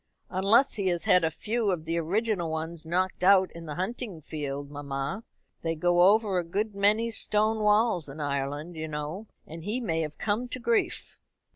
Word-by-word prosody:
"Unless 200 +8 +4
he 200 -3 -2
has 175 -2 +1
had 180 -1 +4
a 160 - +3
few 215 +6 -2
of 170 -4 -1
the 165 +1 -1
original 190 +1 0
ones 160 +1 -4
knocked 185 +2 -1
out 190 0 +5
in 170 -1 -10
the 150 - -5
hunting 195 - -4
field, 145 -2 -5
mamma. 140 +6 -4 0.4
They 165 0 -1
go 175 +2 +2
over 210 -4 +2
a - - -2
good 205 +6 -2
many 210 +4 +2
stone 215 0 +2
walls 210 -6 +2
in 140 +3 -9
Ireland, 145 +3 -3
you 160 0 -4
know, 155 +7 -5 0.2
and 165 +1 -9
he 215 +7 -2
may 165 -9 -1
have 155 -1 -5
come 220 +4 -1
to 255 - -5
grief." 235 -1 -1
180 Hz, 185 wpm, -28 LUFS, 160-210 Hz, 0.4 s, out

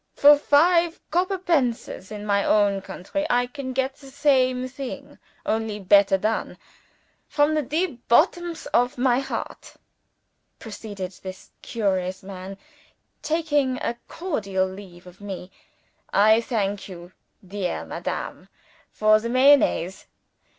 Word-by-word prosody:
For 290 +1 +8
five 335 +4 +3
copper 370 +4 +1
pences, 260 - -1
in 210 -1 -6
my 200 -1 +2
own 200 -2 +2
country, 200 +10 -5
I 245 0 +3
can 260 +1 -6
get 265 +1 -2
the 275 - -14
same 260 -3 +2
thing 260 0 -8 0.3
only 220 -1 -1
better 200 0 +5
done. 215 +3 -2 0.7
From 295 +1 +2
the 305 - +2
deep 295 -2 -3
bottoms 340 +7 +2
of 245 +1 +2
my 250 0 +3
heart," 275 - -6 0.8
proceeded 205 -4 -7
this 185 0 -9
curious 190 -4 -2
man, 190 0 -8 0.6
taking 295 -5 0
a 235 - -2
cordial 200 - -2
leave 185 -2 -10
of 180 +2 -15
me, 190 -2 -7 0.6
"I 220 +3 +5
thank 205 -4 -2
you, 175 -1 -10 0.4
dear 195 -2 -3
madam, - - -5 0.4
for 215 0 +4
the 230 +2 -4
Mayonnaise. 255 -8 +3
235 Hz, 120 wpm, -24 LUFS, 195-285 Hz, 0.8 s, For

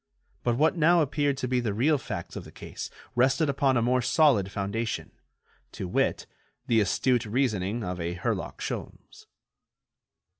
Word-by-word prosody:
But 120 -1 +1
what 155 +5 +3
now 170 0 +4
appeared 145 -1 0
to 130 - -2
be 125 0 +1
the 110 -4 -2
real 145 +6 +3
facts 95 -9 -6
of - - -5
the - - -13
case - - -7 0.2
rested 135 +5 +3
upon 135 -2 +2
a 120 - +2
more 125 +1 +2
solid 120 - +3
foundation, 105 +4 -3 0.6
to 95 - -5
wit, - - 0 0.4
the 115 - +3
astute 120 +4 +1
reasoning 110 -2 0
of 90 -1 -4
a 85 +1 -3
Herlock 90 - -3
Sholmes. - - -7
120 Hz, 155 wpm, -27 LUFS, 105-140 Hz, 0.6 s, now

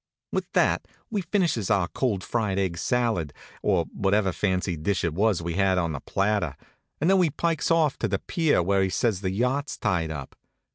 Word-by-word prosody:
With - - -2
that - - +2 0.2
we 210 -3 0
finishes 170 - 0
our 100 -4 +2
cold 105 -4 -1
fried 105 -4 -1
egg 95 -4 -1
salad, 110 - 0 0.3
or - - +2
whatever 100 0 +2
fancy 90 -1 0
dish 85 +5 -1
it 85 - 0
was 100 -1 +1
we 85 0 -2
had 95 0 +2
on 85 -2 0
the 70 - -4
platter, 100 -6 -1 0.4
and 155 - +1
then 190 0 +5
we 175 -3 +4
pikes 160 +1 -1
off 160 -4 +2
to 115 - 0
the 100 -1 0
pier 155 - +1
where 95 +2 +2
he 95 - +1
says 100 -1 0
the 95 - -1
yacht's 125 +8 -1
tied 85 -5 0
up. 75 -4 -7
100 Hz, 195 wpm, -26 LUFS, 90-125 Hz, 0.4 s, then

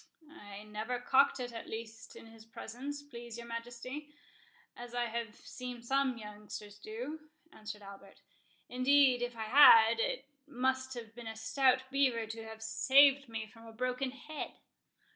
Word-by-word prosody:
"I 205 0 -10
never 215 +4 -4
cocked 265 +3 +3
it 245 -1 -5
at 230 - -7
least 225 0 -8
in - - -11
his 225 -1 -14
presence, 270 +5 -7
please 240 -4 -9
your 235 - -8
Majesty, 240 +5 -7 0.6
as 240 0 -9
I 240 0 +1
have 230 -1 -4
seen 250 -1 -8
some 265 0 +1
youngsters 210 -1 -9
do," 280 +10 -7 0.2
answered 215 -1 -8
Albert; 195 0 -13 0.4
"indeed 255 0 +4
if 245 0 -3
I 220 - -3
had, 225 -2 +8
it - - -1 0.2
must 260 -1 -1
have 230 -2 -8
been 240 0 -9
a 220 - -5
stout 255 +4 +2
beaver 260 -5 +2
to 225 +1 -7
have 220 0 -9
saved 275 +4 +5
me 225 -1 -4
from 225 +1 -15
a 225 - -11
broken 255 +3 -1
head." 285 +4 -7
235 Hz, 160 wpm, -33 LUFS, 220-260 Hz, 0.6 s, had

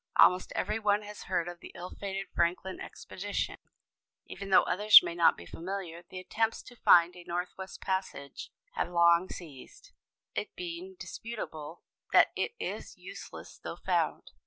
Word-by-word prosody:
Almost 180 0 +5
every 215 +1 -1
one 210 -1 +2
has 210 0 -9
heard 175 -3 0
of 175 0 -7
the - - -11
ill 180 0 -7
fated 195 -1 -4
Franklin 180 +2 0
expedition, 200 +2 -4 0.7
even 195 0 -8
though 190 - +7
others 210 +2 +8
may 170 -1 -3
not 170 -1 +4
be 85 - -10
familiar. 170 - -6
The 185 - -8
attempts 225 +4 -1
to 245 - -13
find 175 -5 +6
a 175 - -11
northwest 180 +2 -5
passage 190 -7 -3 0.2
have - - -2
long 170 +1 +4
ceased, 165 - -11 0.4
it - - -4
being 360 +1 -6
indisputable 175 - -7 0.3
that - - +7
it 460 - -2
is - - -5
useless - - -10
though - - -6
found. - - -1
185 Hz, 155 wpm, -30 LUFS, 170-210 Hz, 0.7 s, others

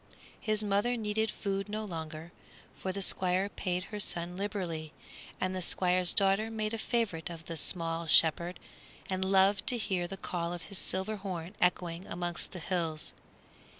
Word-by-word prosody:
His 215 -1 0
mother 205 +4 +1
needed 220 0 0
food 195 0 -2
no 215 +1 -3
longer, 160 -2 -6 0.4
for 190 - -3
the 195 +1 +2
Squire 185 +2 +2
paid 180 -3 -2
her 210 - -2
son 175 -2 -1
liberally 175 -6 -3 0.5
and 185 0 -1
the 185 - -2
Squire's 180 0 +3
daughter 200 +2 +4
made 215 -1 -2
a 225 - -2
favorite 215 -9 -1
of 165 -1 -8
the 165 - -5
small 165 0 +1
shepherd 170 +3 +5 0.5
and 185 0 0
loved 195 +1 +4
to 245 - +6
hear 185 -6 -1
the 195 - -6
call 175 -2 -2
of 175 - -6
his 200 -2 -6
silver 190 +3 -2
horn 185 -2 -5
echoing 180 0 +1
amongst 175 0 -3
the - - -7
hills. 165 -3 -1
185 Hz, 165 wpm, -31 LUFS, 170-205 Hz, 0.5 s, to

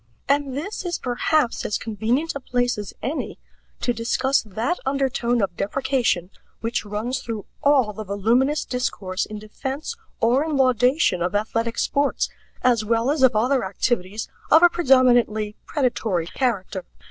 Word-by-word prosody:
And 280 -1 +1
this 390 +9 -4
is 350 -2 -2
perhaps 250 +1 0
as 210 - -1
convenient 230 +8 -1
a 280 - -4
place 245 -3 0
as 205 - -6
any 300 +5 -3 0.4
to 245 - +1
discuss 250 +4 +1
that 225 - -2
undertone 260 -4 0
of 185 -3 -2
deprecation 230 -4 0 0.3
which 230 +1 -2
runs 215 +5 -2
through 225 -3 -5 0.2
all 270 -7 +3
the 215 - -6
voluminous 230 +9 +1
discourse 200 -6 -2
in 215 - -7
defense 265 - -5 0.2
or 245 +5 +3
in 310 -3 -1
laudation 255 - +3
of 180 +3 -1
athletic 230 +2 -1
sports, 285 0 +1 0.3
as 240 -3 +3
well 230 +4 +1
as 295 -2 -1
of 260 -3 +5
other 250 +5 +2
activities 195 +1 -1 0.2
of 320 +2 +7
a 350 - +9
predominantly 245 -9 +3
predatory 225 - 0
character. 195 -3 -2
245 Hz, 145 wpm, -23 LUFS, 215-270 Hz, 0.4 s, a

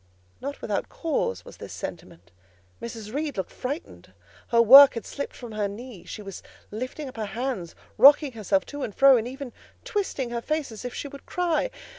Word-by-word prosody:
Not 280 +2 -6
without - - -2
cause 95 - -2
was - - -12
this - - -9
sentiment: 85 +2 -8 0.5
Mrs. 225 -2 -7
Reed 290 -3 -3
looked 190 - -3
frightened; 285 +7 -6 0.3
her 235 - +2
work 270 +5 +10
had 230 - -5
slipped 280 - -6
from 240 -2 -9
her 210 -1 -1
knee; 215 0 -9
she 210 - -8
was 195 -2 -8 0.3
lifting 255 +7 -5
up 255 - -10
her 220 - -2
hands, 240 -10 -3 0.2
rocking 285 +3 +7
herself 205 -4 0
to 290 0 -7
and 215 - -4
fro, 275 -1 +7
and 230 -1 0
even 265 0 -7 0.3
twisting 285 - -2
her 235 -1 -2
face 305 0 -2
as 220 - -9
if 245 - -6
she - - -4
would 280 0 -12
cry. 355 +6 0
250 Hz, 190 wpm, -26 LUFS, 215-280 Hz, 0.5 s, work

